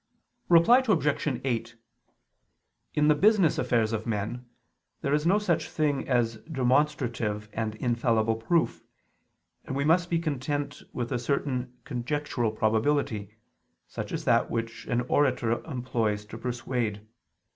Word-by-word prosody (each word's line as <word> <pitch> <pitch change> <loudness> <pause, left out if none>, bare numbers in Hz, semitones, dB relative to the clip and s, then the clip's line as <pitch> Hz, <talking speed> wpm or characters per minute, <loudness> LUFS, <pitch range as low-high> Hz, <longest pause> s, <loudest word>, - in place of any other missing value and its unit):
Reply 175 +9 +7
Obj. 150 - +1
8: 115 -3 -2 1.2
In 150 0 +3
the 150 - +6
business 195 +1 +4
affairs 115 -2 +1
of 110 +1 -3
men, 115 +3 -3 0.5
there 140 - 0
is 150 +2 +2
no 195 +4 +5
such 195 -6 0
thing 145 -4 -1
as 120 -3 +1
demonstrative 125 -6 0
and 110 -1 -2
infallible 115 -1 +1
proof, 165 +9 0 0.8
and 135 - -4
we 140 +1 0
must 175 +3 +3
be 170 - +2
content 145 -2 -3
with 120 -1 -4
a - - 0
certain 125 -1 -2
conjectural 125 -2 -2
probability, 110 -1 0 0.5
such - - -6
as - - -4
that - - +3
which 115 0 -4
an 120 - +1
orator 125 -3 +1
employs 115 -7 -2
to 110 +1 -9
persuade. 120 -3 -3
125 Hz, 130 wpm, -27 LUFS, 115-150 Hz, 1.2 s, Reply